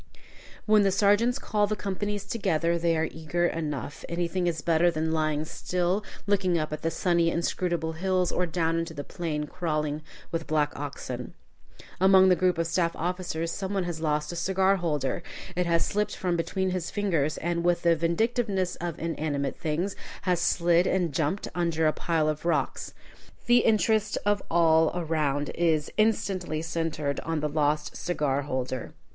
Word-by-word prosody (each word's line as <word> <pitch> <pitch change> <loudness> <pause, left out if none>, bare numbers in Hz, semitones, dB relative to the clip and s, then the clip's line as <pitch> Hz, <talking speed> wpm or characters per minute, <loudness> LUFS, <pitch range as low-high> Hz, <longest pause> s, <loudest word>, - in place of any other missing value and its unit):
When 215 -1 +5
the 200 - +4
sergeants 205 +5 +3
call 210 -5 0
the 215 - -1
companies 205 0 -3
together, 170 -6 0
they 165 -1 +2
are 160 +1 +1
eager 165 +2 -1
enough. 150 -4 -3
Anything 175 +1 -1
is 160 -3 -2
better 170 +1 +4
than 160 -1 -1
lying 155 -1 0
still 180 +4 -1 0.2
looking 190 -4 +2
up 155 -1 -2
at 155 - -5
the 165 - 0
sunny, 170 -1 +2
inscrutable 170 -1 -1
hills, 185 +2 0
or 180 - 0
down 165 0 0
into 165 -1 -4
the 145 - -4
plain 160 -4 -3
crawling 155 -3 -2 0.3
with 165 -1 -3
black 150 -1 +1
oxen. 130 -3 -6 0.6
Among 190 0 +6
the 180 - +6
group 180 -1 +2
of 165 - +1
staff 170 0 0
officers 175 -1 -2
some 195 +2 -3
one 190 - +1
has 170 -2 -4
lost 150 -1 0
a - - -6
cigar 190 +2 +2
holder. 150 -5 -1 0.3
It 180 0 0
has 170 -1 +2
slipped 210 0 -1
from 180 -2 -1
between 185 +2 -1
his 180 -2 -2
fingers, 165 -8 0
and, 170 0 -1
with 175 0 +2
the 170 -1 +5
vindictiveness 190 +3 0
of 170 -2 -4
inanimate 150 -4 -2
things, 170 +6 -1 0.3
has 180 -3 +1
slid 175 +1 +3
and 175 -5 +1
jumped 160 +7 -1
under 165 -2 0
a 155 - +3
pile 165 -2 0
of 155 -1 -2
rocks. 170 - -1 0.5
The 240 0 +6
interest 215 -1 +2
of 205 -1 +2
all 160 -1 +4
around 150 -4 0
is 160 -3 +1
instantly 195 -7 0
centred 160 -4 -2
on 165 -1 -2
the 150 - 0
lost 150 0 0
cigar 145 -5 -1
holder. 130 -3 -3
170 Hz, 170 wpm, -27 LUFS, 155-185 Hz, 0.6 s, Among